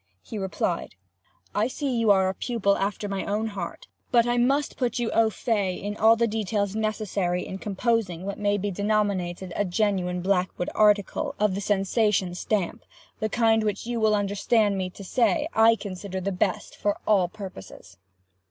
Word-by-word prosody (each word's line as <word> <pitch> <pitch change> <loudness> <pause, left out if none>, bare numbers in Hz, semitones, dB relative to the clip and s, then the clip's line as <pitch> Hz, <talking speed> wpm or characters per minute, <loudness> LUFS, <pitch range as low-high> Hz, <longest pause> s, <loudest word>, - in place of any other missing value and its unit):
he 230 - -9
replied. 180 - -2 0.6
"I 210 +2 +2
see 265 0 -2
you 230 -2 +2
are 190 -2 +5
a 190 - 0
pupil 200 -2 0
after 205 +1 -2
my 195 -1 -3
own 215 +2 -1
heart. 190 -5 -6 0.2
But 235 -2 +4
I 240 0 +1
must 275 +4 +1
put 250 -2 -1
you 240 -2 -1
au 225 -1 +4
fait 200 -4 -1 0.2
to 220 +1 +5
the 235 - +3
details 210 -2 -1
necessary 205 -5 -1
in 190 - -6
composing 200 -4 -1
what 200 +1 -4
may 205 0 +1
be 205 +1 -2
denominated 195 -3 -1
a - - +1
genuine 180 -2 0
Blackwood 185 -2 0
article 210 -2 +2
of 210 -2 +2
the 200 - -3
sensation 200 -1 +1
stamp—the 210 +3 -4
kind 225 0 +3
which 210 -1 -2
you 240 0 -2
will 215 -1 +3
understand 205 +1 +1
me 185 -1 -2
to 200 - -11
say 275 - +1
I 225 +1 +6
consider 190 -2 -6
the 195 +2 -2
best 200 +3 -1
for 205 0 -1
all 195 -4 +3
purposes. 175 - -10
205 Hz, 170 wpm, -26 LUFS, 190-220 Hz, 0.6 s, I